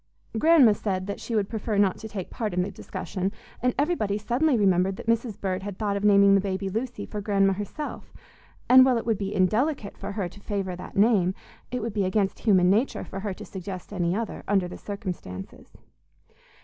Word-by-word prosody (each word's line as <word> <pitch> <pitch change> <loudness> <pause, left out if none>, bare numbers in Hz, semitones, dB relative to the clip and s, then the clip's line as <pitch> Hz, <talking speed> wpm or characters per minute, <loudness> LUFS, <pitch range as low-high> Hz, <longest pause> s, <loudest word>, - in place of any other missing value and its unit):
Grandma 310 -8 +6
said 190 -3 -2
that 200 - -5
she 230 - -4
would 205 -2 +1
prefer 220 -1 -2
not 200 -2 +3
to 220 - -7
take 200 -4 -5
any - - -26
part 215 -5 -3
in 180 - +2
the 200 - -4
discussion, 190 0 -4 0.3
and 250 +1 +1
everybody 280 - +1
suddenly 245 +6 +1
remembered 190 -2 +3
that - - -9
Mrs. 230 -2 0
Bird 185 -1 -2
had 200 -1 -6
thought 205 -2 -1
of 200 - -3
naming 200 -1 +6
the 195 - +5
baby 195 0 -2
Lucy, 230 +6 -4
for 210 - -5
Grandma 195 -1 +2
herself; 205 +10 -6 0.6
and, 255 +1 +9
while 255 -2 +3
it 230 - -3
would 225 -3 0
be 195 -1 -2
indelicate 215 - +1
for 200 - -5
her 200 -3 -2
to 185 +4 -13
favor 195 -3 -3
that 180 - -9
name, 200 -4 +4 0.3
it 250 -3 -3
would 230 -2 -3
be 205 -2 +1
against 190 +1 0
human 185 -5 +4
nature 215 +8 +2
for 195 - -6
her 200 -1 -4
to - - -9
suggest 190 +1 -7
any 175 -2 0
other, 225 0 -4
under 195 -3 +2
the 175 - -8
circumstances. 180 - -7
200 Hz, 210 wpm, -26 LUFS, 190-225 Hz, 0.6 s, and